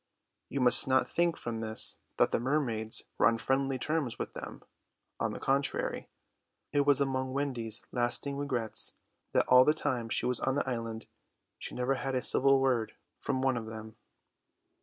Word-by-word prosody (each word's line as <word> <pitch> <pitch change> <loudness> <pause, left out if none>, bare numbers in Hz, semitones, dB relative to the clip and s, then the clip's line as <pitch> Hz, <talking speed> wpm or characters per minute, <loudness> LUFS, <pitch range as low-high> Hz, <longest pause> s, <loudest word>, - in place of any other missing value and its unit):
You 135 - -2
must 125 +1 +8
not 130 0 +2
think 170 -1 0
from 115 -1 -5
this 110 0 +1 0.2
that - - +3
the - - +1
mermaids 120 -4 0 0.2
were - - +5
on 115 0 +2
friendly 135 +3 -1
terms 150 -1 -2
with - - -5
them: - - -9 0.6
on - - -1
the - - -7
contrary, 140 +1 -1 0.6
it 145 -1 +1
was 145 -1 +5
among 130 -1 -1
Wendy's 125 -6 -3
lasting 120 +3 -1
regrets 130 -6 -3 0.4
that - - +3
all 125 0 +7
the 150 +3 +2
time 125 -7 -2
she - - 0
was 125 -1 +1
on 130 0 -1
the 145 - -1
island 115 -3 -4 0.5
she - - -6
never 125 +2 0
had 135 0 -3
a 125 - -1
civil 135 0 +5
word 125 -4 0 0.3
from 130 0 -2
one 135 -1 +2
of 110 -1 -6
them. 110 0 -9
130 Hz, 175 wpm, -30 LUFS, 115-135 Hz, 0.6 s, must